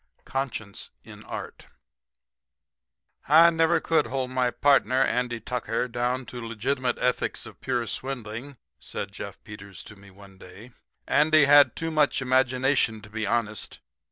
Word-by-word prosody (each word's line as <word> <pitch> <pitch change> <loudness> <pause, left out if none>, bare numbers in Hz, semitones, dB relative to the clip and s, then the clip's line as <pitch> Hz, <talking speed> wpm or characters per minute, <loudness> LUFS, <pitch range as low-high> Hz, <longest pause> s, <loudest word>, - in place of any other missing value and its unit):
'" - - -39
CONSCIENCE 120 -7 -4
IN - - -13
ART - - -8 1.6
"I 165 +3 +7
never 165 +1 +2
could 165 - +1
hold 130 -1 -3
my 130 -1 +1
partner, 135 -1 +3
Andy 120 -2 -1
Tucker, 125 +1 -2
down 125 +2 -2
to 120 0 -8
legitimate 125 +3 -2
ethics 125 - -1
of - - -13
pure 120 -1 -1
swindling," 125 +1 -5 0.2
said - - -6
Jeff - - -8
Peters 105 -3 -10
to 105 - -12
me 100 0 -16
one 95 0 -16
day. 95 +8 -13 0.4
"Andy 155 0 +4
had 145 0 +6
too 165 0 -3
much 150 -2 +2
imagination 130 -2 +1
to 105 -1 -14
be 110 -1 -3
honest. 110 -1 -2
125 Hz, 145 wpm, -26 LUFS, 110-135 Hz, 1.6 s, I